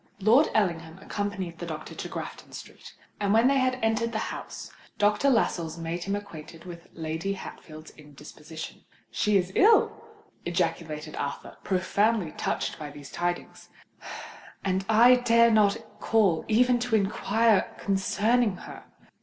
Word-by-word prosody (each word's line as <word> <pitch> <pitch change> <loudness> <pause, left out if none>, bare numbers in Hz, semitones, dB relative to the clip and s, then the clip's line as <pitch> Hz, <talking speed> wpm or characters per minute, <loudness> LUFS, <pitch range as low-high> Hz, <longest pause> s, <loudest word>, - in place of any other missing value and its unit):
Lord 230 +9 +5
Ellingham 170 -5 0
accompanied 195 -3 -4
the 175 - -5
doctor 155 -1 -7
to - - -6
Grafton - - -8
Street; - - -11 0.2
and 200 -1 +1
when 230 +3 +5
they 275 0 +3
had 255 0 +1
entered 225 +1 +1
the 220 - -2
house, - - -8 0.3
Dr. 210 +6 +3
Lascelles 170 -10 0
made 170 +1 -4
him 200 +1 -1
acquainted 165 -5 -9
with 175 -1 -10
Lady 160 +4 -3
Hatfield's 155 -4 -10
indisposition. 150 +1 -11 0.3
"She 210 -2 +2
is 185 -1 -1
ill!" 435 - +5 0.5
ejaculated 165 -3 -2
Arthur, 140 0 -5
profoundly 200 0 +1
touched - - -3
by 150 -1 -6
these 145 -1 -11
tidings: 175 0 -4 1.0
"and 190 0 0
I 240 +3 +7
dare 235 -1 +4
not 210 -2 +4 0.2
call 200 -8 +2
even 245 +2 +3
to 245 -2 0
inquire 215 +1 +2
concerning 205 +3 +1
her!" - - -10
195 Hz, 135 wpm, -27 LUFS, 165-225 Hz, 1.0 s, I